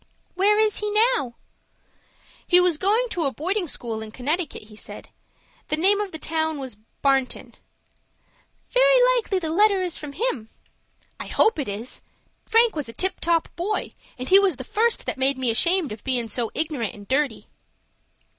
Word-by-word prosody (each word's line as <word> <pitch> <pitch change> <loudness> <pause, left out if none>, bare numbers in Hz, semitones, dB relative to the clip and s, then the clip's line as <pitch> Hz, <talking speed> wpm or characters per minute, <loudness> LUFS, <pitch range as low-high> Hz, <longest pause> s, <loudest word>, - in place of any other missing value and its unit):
"Where 405 +3 +3
is 430 -1 +2
he 420 - -2
now?" 430 - +2 1.1
"He 360 - +6
was 355 -4 +2
going 435 +6 +2
to 335 -3 -1
a 275 - +1
boarding 360 +7 -2
school 230 -6 -4
in 220 - -7
Connecticut, 295 +8 -2
he 215 0 -15
said. - - -10 0.6
The 305 - 0
name 400 +5 +3
of 405 -2 -4
the 315 - -6
town 315 0 -2
was 260 -5 -6 0.3
Barnton." 270 -2 0 1.2
"Very - - +5
likely 435 -5 0
the 325 -4 -3
letter 400 +1 +3
is 355 -2 -3
from 295 -2 -8
him." 280 - -2 0.7
"I - - -6
hope 435 - +2
it 280 - -3
is. 210 +5 -7 0.5
Frank 455 -2 +4
was 290 -6 -3
a - - -8
tip 375 +10 -1
top 335 -1 +1
boy, 395 +5 -3 0.2
and 255 0 -6
he 385 - +7
was 390 -5 +2
the 260 - -8
first 455 - 0
that - - -3
made 265 +1 +1
me 255 -3 +1
ashamed 340 - +2
of 215 0 -8
bein' 250 -3 -1
so 225 +1 -2
ignorant 300 -8 -2
and 205 -1 -13
dirty." 270 -3 -1
320 Hz, 175 wpm, -23 LUFS, 260-410 Hz, 1.2 s, he